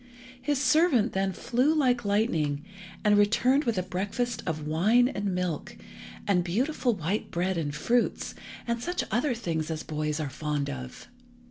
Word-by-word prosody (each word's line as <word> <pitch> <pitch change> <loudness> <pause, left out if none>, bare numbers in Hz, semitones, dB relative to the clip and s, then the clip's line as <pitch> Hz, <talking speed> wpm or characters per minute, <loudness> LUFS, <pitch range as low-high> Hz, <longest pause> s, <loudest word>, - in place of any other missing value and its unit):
His 285 +1 0
servant 265 - +3
then 195 0 +1
flew 250 - +1
like 250 -5 +2
lightning, 165 -9 0 0.4
and 210 -1 +5
returned 250 +7 +3
with 230 -4 0
a 185 - +1
breakfast 205 +6 -2
of 155 -2 -2
wine 210 +11 +4
and 205 -6 -4
milk, 180 -4 -3 0.5
and 180 -3 +2
beautiful 245 - 0
white 190 +4 -2
bread 185 +2 -1
and 150 -3 -2
fruits, 235 +10 0 0.3
and 235 -1 -1
such 355 +7 -1
other 245 +3 +1
things 165 -8 -2
as 160 -1 -3
boys 150 0 -2
are 155 - -2
fond 145 -2 -2
of. 130 -2 -8
200 Hz, 155 wpm, -28 LUFS, 160-245 Hz, 0.5 s, and